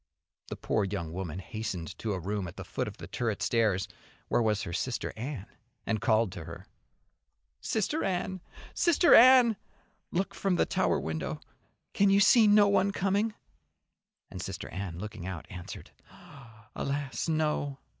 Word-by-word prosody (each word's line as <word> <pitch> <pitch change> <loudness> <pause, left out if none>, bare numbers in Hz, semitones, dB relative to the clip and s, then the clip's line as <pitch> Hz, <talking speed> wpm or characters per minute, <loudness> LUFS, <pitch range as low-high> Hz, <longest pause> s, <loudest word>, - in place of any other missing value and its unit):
The - - -5
poor 105 - 0
young 95 -5 -4
woman 90 -3 -4
hastened 95 -4 -5
to 110 -2 -2
a 95 - -3
room 100 +1 -3
at 85 - -10
the - - -6
foot - - -3
of - - -8
the - - -8
turret 115 -4 -2
stairs 110 -5 +1 0.4
where - - +2
was 105 -3 +1
her 85 - -5
Sister 125 +6 -2
Anne, 120 -2 -5 0.4
and 110 -2 -1
called 110 -4 +2
to 85 -2 -8
her. - - -9 0.9
"Sister 225 - -1
Anne, 185 0 -2 0.3
Sister 340 0 +4
Anne, 245 -3 +8 0.5
look 190 +3 -1
from 195 -2 0
the - - +2
tower - - +1
window. 80 0 -4 0.5
Can 200 0 +4
you 195 +1 +5
see 215 +2 +6
no 205 0 +6
one 200 0 +3
coming?" 200 +3 0 1.0
And 95 - -6
Sister 95 +1 -6
Anne, 95 -3 -5
looking 105 -1 -7
out, 90 -4 -6
answered: 90 -1 -9 0.8
"Alas! 140 0 -3
No! 150 -3 0
115 Hz, 155 wpm, -29 LUFS, -, 1.0 s, Anne